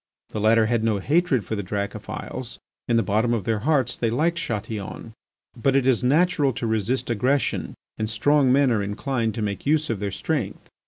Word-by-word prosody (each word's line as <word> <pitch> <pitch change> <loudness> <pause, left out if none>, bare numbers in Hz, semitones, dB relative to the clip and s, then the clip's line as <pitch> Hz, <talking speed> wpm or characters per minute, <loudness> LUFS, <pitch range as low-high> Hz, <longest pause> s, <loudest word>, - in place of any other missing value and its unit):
The - - -4
latter 110 +1 +4
had 115 0 0
no 110 -2 +2
hatred 145 - +1
for 110 - -3
the 100 - -2
Dracophils. 100 +1 -5 0.3
In 120 - +2
the 115 - +3
bottom 110 +4 +1
of 110 - -2
their 110 +2 0
hearts 135 -1 +1
they 115 - 0
liked 165 +8 +1
Chatillon. 110 - -5 0.4
But 135 +3 +1
it 135 -2 +3
is 130 -2 +2
natural 145 0 +3
to 115 - -4
resist 110 +3 0
aggression 125 +5 0 0.2
and 110 0 -1
strong 135 +4 +3
men 135 0 +4
are 110 -3 +1
inclined 110 +2 -2
to 110 - -2
make 100 +5 -4
use 155 -2 +2
of 110 - -3
their 100 0 -2
strength. 95 +1 -3
115 Hz, 195 wpm, -24 LUFS, 110-135 Hz, 0.4 s, latter